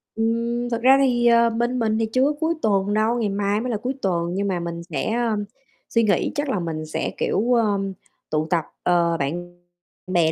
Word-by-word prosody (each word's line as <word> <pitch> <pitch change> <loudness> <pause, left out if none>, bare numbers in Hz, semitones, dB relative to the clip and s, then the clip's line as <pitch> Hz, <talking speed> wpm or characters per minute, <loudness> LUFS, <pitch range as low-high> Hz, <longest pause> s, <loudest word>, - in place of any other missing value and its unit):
Ừm. 235 +2 -1
Thực 230 -1 -2
ra 265 +2 +6
thì, 245 -3 +2
ờ, 235 0 +5
bên 240 +2 -1
mình 220 -1 +1
thì 225 - +1
chưa 255 +4 +1
có 290 - +2
cuối 325 +1 +1
tuần 200 -1 +1
đâu, 225 +3 +1
ngày 210 -3 0
mai 200 +2 0
mới 250 0 -2
là 215 - 0
cuối 250 +5 -3
tuần, 175 -2 0
nhưng 200 +2 -1
mà 180 -2 -1
mình 170 0 -5
sẽ, 170 +3 -3
ơ, 230 -3 0 0.5
suy 230 - +2
nghĩ. 200 -5 +1
Chắc 290 0 -1
là 210 -8 0
mình 160 -2 -4
sẽ, 155 - -3
kiểu, 235 +4 +1
ờ, 215 -4 +2 0.5
tụ 155 0 0
tập, 170 -2 +1 0.2
ờ, 170 -1 +2
bạn 175 +5 -4 0.5
bè 170 -3 +2
215 Hz, 215 wpm, -23 LUFS, 175-235 Hz, 0.5 s, ra